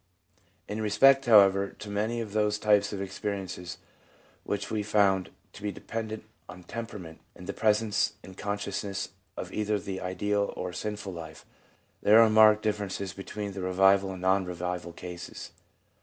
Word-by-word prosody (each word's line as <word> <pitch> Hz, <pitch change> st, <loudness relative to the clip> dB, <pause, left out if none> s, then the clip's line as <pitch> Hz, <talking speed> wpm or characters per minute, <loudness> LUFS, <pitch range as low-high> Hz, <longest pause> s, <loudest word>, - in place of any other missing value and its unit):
In 105 Hz, +1 st, -4 dB
respect, 135 Hz, +6 st, +5 dB
however, 100 Hz, -3 st, +6 dB
to 105 Hz, -, -9 dB
many 110 Hz, +3 st, -1 dB
of 105 Hz, -3 st, -6 dB
those 105 Hz, -1 st, +1 dB
types 105 Hz, -1 st, +3 dB
of 100 Hz, -, -4 dB
experi 100 Hz, +1 st, -3 dB
ence 90 Hz, -1 st, -7 dB, 0.7 s
which 100 Hz, +1 st, -3 dB
we 110 Hz, -, 0 dB
have 105 Hz, -, -7 dB
found 100 Hz, -3 st, +3 dB, 0.2 s
to 105 Hz, 0 st, -4 dB
depend 110 Hz, +1 st, -5 dB, 0.3 s
on 90 Hz, 0 st, -10 dB
temperament 100 Hz, -7 st, -7 dB, 0.2 s
and 90 Hz, -, -11 dB
the 100 Hz, -, -4 dB
presence 105 Hz, -1 st, +2 dB
in 95 Hz, -, -11 dB
consciousness 100 Hz, 0 st, -3 dB, 0.3 s
of 95 Hz, -, -6 dB
either 105 Hz, 0 st, 0 dB
the 95 Hz, -1 st, -5 dB
ideal 100 Hz, +3 st, -1 dB
or 90 Hz, -1 st, -4 dB
sinful 105 Hz, -1 st, -4 dB
life, 80 Hz, -2 st, -9 dB, 0.6 s
there 105 Hz, +2 st, +7 dB
are 115 Hz, -1 st, +6 dB
marked 110 Hz, 0 st, +6 dB
differences 100 Hz, -3 st, -2 dB
between 100 Hz, +1 st, -6 dB
the 95 Hz, -1 st, -6 dB
revival 95 Hz, +1 st, +3 dB
and 95 Hz, -, -9 dB
non 95 Hz, +1 st, +3 dB
revival 90 Hz, -1 st, -4 dB
cases. 90 Hz, 0 st, -8 dB
100 Hz, 155 wpm, -28 LUFS, 95-105 Hz, 0.7 s, there